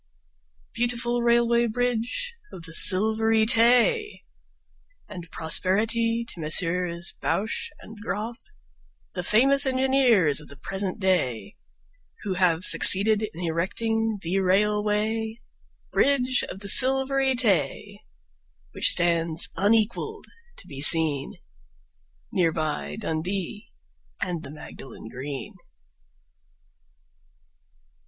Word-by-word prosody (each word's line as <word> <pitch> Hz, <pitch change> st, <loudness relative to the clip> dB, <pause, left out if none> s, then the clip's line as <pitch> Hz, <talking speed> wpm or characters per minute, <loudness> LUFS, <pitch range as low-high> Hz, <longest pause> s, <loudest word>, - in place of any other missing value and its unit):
Beautiful 240 Hz, 0 st, -2 dB
Railway 235 Hz, 0 st, +1 dB
Bridge 245 Hz, -, -3 dB, 0.2 s
of 170 Hz, -, -12 dB
the 165 Hz, -1 st, -8 dB
Silvery 220 Hz, +4 st, +2 dB
Tay! 245 Hz, -, +2 dB, 0.8 s
And 175 Hz, -4 st, -11 dB
prosperity 225 Hz, +9 st, -1 dB
to 170 Hz, -, -9 dB
Messrs 170 Hz, +2 st, +1 dB
Bouche 215 Hz, +3 st, -3 dB
and 220 Hz, 0 st, -14 dB
Grothe, 225 Hz, +3 st, -6 dB, 0.7 s
The 180 Hz, -, -5 dB
famous 270 Hz, +9 st, +2 dB
engineers 255 Hz, -, +1 dB
of 150 Hz, -, -16 dB
the 140 Hz, -, -9 dB
present 195 Hz, +4 st, -5 dB
day, 185 Hz, -, -2 dB, 0.7 s
Who 200 Hz, -3 st, -3 dB
have 180 Hz, -2 st, 0 dB
succeeded 210 Hz, +3 st, +6 dB
in 175 Hz, -3 st, -7 dB
erecting 220 Hz, +6 st, -2 dB
The 180 Hz, +4 st, -1 dB
Railway 210 Hz, +3 st, -1 dB, 0.5 s
Bridge 260 Hz, -2 st, 0 dB
of 195 Hz, -, -10 dB
the 200 Hz, -, 0 dB
Silvery 265 Hz, +2 st, +4 dB
Tay, 205 Hz, -, -1 dB, 0.7 s
Which -, -, +1 dB
stands 170 Hz, -1 st, +3 dB
unequalled 225 Hz, -, -1 dB, 0.3 s
to -, -, -11 dB
be 140 Hz, -2 st, -8 dB
seen 150 Hz, -3 st, +4 dB, 1.0 s
Near 170 Hz, -3 st, +1 dB
by 155 Hz, -2 st, -5 dB
Dundee 190 Hz, +1 st, -5 dB, 0.5 s
and 175 Hz, -3 st, -4 dB
the -, -, -10 dB
Magdalen 135 Hz, -5 st, -12 dB
Green. 130 Hz, 0 st, -8 dB
210 Hz, 100 wpm, -23 LUFS, 170-235 Hz, 1.0 s, succeeded